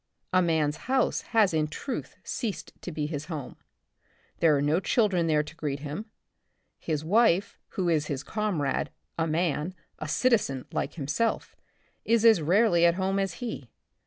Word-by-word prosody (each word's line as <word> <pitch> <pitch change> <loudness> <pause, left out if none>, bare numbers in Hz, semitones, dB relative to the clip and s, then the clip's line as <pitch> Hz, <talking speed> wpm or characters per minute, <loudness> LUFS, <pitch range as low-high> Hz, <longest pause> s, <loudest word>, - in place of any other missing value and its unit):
A 185 - +5
man's 160 -3 +1
house 265 0 +2
has 215 -6 +4
in 155 -1 +1
truth 205 - -5
ceased 225 -6 -4
to 180 - -6
be 150 -2 -2
his 150 -1 -4
home. 155 -6 -6 0.8
There 155 -3 +4
are - - 0
no 150 +4 +2
children 190 -4 +2
there 150 -2 +3
to 155 +2 -11
greet 145 -4 -3
him, 155 +9 -5 0.7
his 155 -2 -2
wife, 200 0 +3
who 185 -2 -1
is 155 -3 +1
his 140 -2 -3
comrade, 155 -10 -1 0.3
a 165 - +1
man, 165 +1 -1 0.2
a 155 - -4
citizen 145 - +1
like - - -2
himself, 170 +10 -1 0.5
is 230 0 +2
as 220 -7 +7
rarely 175 +2 +4
at 170 0 +5
home 190 +1 0
as 195 -3 -1
he. 190 - -6
170 Hz, 160 wpm, -28 LUFS, 150-200 Hz, 0.8 s, as